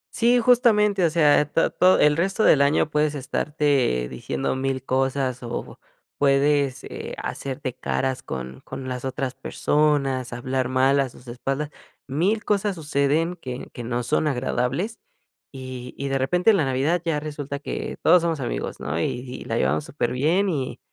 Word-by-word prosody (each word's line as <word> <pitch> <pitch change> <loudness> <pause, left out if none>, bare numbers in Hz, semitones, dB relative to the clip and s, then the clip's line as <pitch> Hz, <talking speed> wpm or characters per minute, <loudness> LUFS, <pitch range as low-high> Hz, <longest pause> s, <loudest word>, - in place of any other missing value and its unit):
Sí, 240 +1 +4
justamente, 215 -6 +4
o - - +3
sea, 150 -3 +4
eh, - - 0
ta 165 - +1
to 185 +1 +4
el 150 +1 +4
resto 195 +5 +1
del 140 - +6
año 145 +2 +3
puedes 150 0 0
estarte 140 - 0
diciendo 70 - -3
1000 130 -1 -2
cosas 130 -1 0
o 120 0 -6 0.4
puedes, 140 -1 +2
eh, - - -7
hacerte 135 -1 -4
caras 130 0 -2
con 65 0 -7
con 130 - -7
las 125 0 -4
otras 130 -1 -3
personas, 140 -5 0
hablar 130 +1 -2
mal 135 +2 +3
a 135 -2 +1
sus 125 +1 -17
espaldas, 135 +5 -3 0.4
1000 185 +11 0
cosas 205 -1 +1
suceden 155 +2 0
que 125 -5 -7
que 120 - -7
no 120 +1 -2
son 155 +6 +1
agradables, 135 - -1 0.5
y 130 -2 -8
y 140 0 -3
de 135 0 0
repente, 180 +10 +3
en 200 - +3
la 145 - +2
Navidad, 140 +7 +1
ya 160 -3 0
resulta 145 -2 -5
que 145 - -5
todos 180 -1 +6
somos 165 -3 -1
amigos, - - -4
¿no?, 75 +3 -3
y - - +1
y 125 +1 -5
la - - -2
llevamos 70 +4 +1
superbién 150 +9 0
y 140 -8 -2
140 Hz, 170 wpm, -24 LUFS, 130-160 Hz, 0.5 s, del